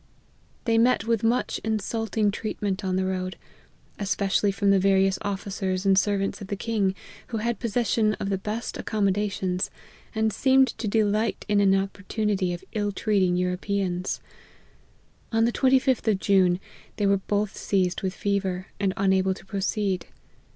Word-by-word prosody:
They 225 -1 +3
met 245 +2 +3
with 230 -2 +1
much 235 +2 +1
insulting 220 -1 0
treatment 205 -2 -3
on 185 -1 0
the 190 0 +1
road, 185 0 -3 0.6
especially 200 0 +1
from 200 0 +2
the 195 - +5
various 195 0 +3
officers 195 -1 -2
and 195 -1 +5
servants 195 0 0
of 200 - -6
the 200 - -2
king, 200 -2 0 0.3
who 230 - -3
had 230 0 -1
possession 225 -2 +1
of 195 - -4
the 195 - 0
best 215 +4 -4
accommodations, 195 -3 0 0.5
and 220 -1 +1
seemed 265 -1 +4
to 225 - -2
delight 215 +1 +1
in 205 -1 +3
an 195 -1 +5
opportunity 195 0 -1
of 175 - -5
ill 205 -1 0
treating 195 -3 +1
Europe 180 +2 -2
ans. 185 -2 -1 1.1
On 225 0 +3
the 235 - +2
25th 260 -2 +2
of 200 - +1
June, 185 -3 +3 0.4
they 205 - 0
were 200 0 +4
both 205 +1 -1
seized 185 -3 0
with 190 -1 -2
fever, 190 -2 -1
and 195 -1 0
unable 190 -1 +2
to - - -14
proceed. 195 -1 -1
200 Hz, 155 wpm, -26 LUFS, 190-215 Hz, 1.1 s, the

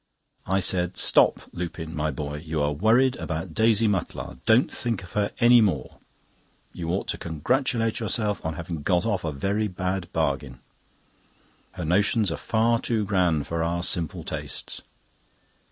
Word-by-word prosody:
I 95 +1 +1
said: 90 -1 +2
"Stop, - - +4
Lupin, 85 -2 -5
my 75 0 0
boy; 75 0 -4
you 80 0 -4
are 75 - +1
worried 115 - +3
about 80 +1 -4
Daisy 110 +2 +3
Mutlar. 95 - -3
Don't 115 +4 +4
think 115 -5 -2
of 85 - -12
her 105 -1 +1
any 120 0 +7
more. 85 - -1 0.7
You 85 -1 -5
ought 90 +3 -1
to - - -2
congratulate 115 - 0
yourself 105 -2 -1
on 80 0 -3
having 80 -1 -5
got 90 +3 +1
off 100 -5 -1
a 80 - -2
very 100 +9 -1
bad 90 -1 -3
bargain. 70 -5 -2 1.1
Her 90 -2 -5
notions 100 +3 +2
are - - -3
far 115 +1 +1
too 110 -3 -1
grand 90 -7 +1
for 85 +2 -2
our 85 +1 -1
simple 85 -4 0
tastes." - - -5
90 Hz, 155 wpm, -25 LUFS, 80-110 Hz, 1.1 s, any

